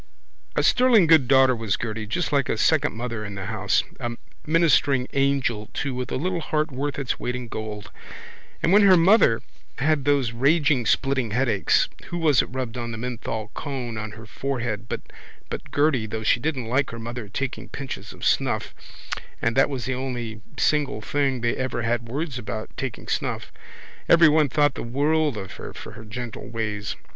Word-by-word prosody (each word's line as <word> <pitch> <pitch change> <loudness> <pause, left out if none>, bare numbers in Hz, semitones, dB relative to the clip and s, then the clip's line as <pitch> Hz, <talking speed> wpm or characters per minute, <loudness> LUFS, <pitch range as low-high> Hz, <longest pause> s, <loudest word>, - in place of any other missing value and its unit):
A - - +2
sterling 245 -7 +5
good 160 -5 +5
daughter 130 -1 +5
was 110 -3 -1
Gerty 110 -2 -4
just 165 +12 -1
like 140 -3 +2
a - - 0
second - - +2
mother 115 -2 -4
in 105 -1 -6
the 95 -1 -5
house, 105 -1 +1 0.2
a 120 -2 -3 0.3
ministering 150 -5 +3
angel 135 -6 +1
too 140 -2 -2
with 125 0 -4
a - - -1
little 175 +6 -1
heart 155 0 -1
worth 140 +2 -3
its 140 -3 -2
weight 125 - -2
in 125 -1 -5
gold. 110 -2 -6 0.7
And 170 - +3
when 205 - +7
her 190 -2 +7
mother 170 - +5 0.3
had 150 +1 +1
those 140 -5 +2
raging 140 0 +2
splitting 135 0 +1
headaches 115 -3 +2 0.2
who 175 - -5
was 155 -6 +4
it - - -4
rubbed 125 -2 -4
the 120 -2 -4
menthol 115 -2 -4
cone 130 -5 -4
on 110 -1 -5
her 110 0 -10
forehead 115 -3 -3
but - - -3 0.7
Gerty 145 -6 +2
though 110 0 -4
she 120 - +3
didn't 135 -2 -2
like 130 +4 +1
her 115 - -7
mother's 115 -1 -6
taking 135 +2 -4
pinches 125 -8 -6
of - - -8
snuff - - +1 0.7
and 115 0 0
that 135 - +4
was 130 -4 -4
the 130 - -1
only 120 -4 -4 0.2
single 145 -7 +1
thing 135 -1 0
they 120 0 +1
ever 130 -2 -2
had 120 0 -1
words 140 0 -3
about, 110 -1 -6
taking 130 -4 -5
snuff. - - -2 0.6
Everyone 155 -3 +6
thought 145 +1 +3
the - - -6
world 145 +2 +1
of 95 -2 -6
her - - -8
for - - -8
her 110 +1 -11
gentle 115 +2 -6
ways. 105 -3 -3
125 Hz, 180 wpm, -24 LUFS, 115-145 Hz, 0.7 s, when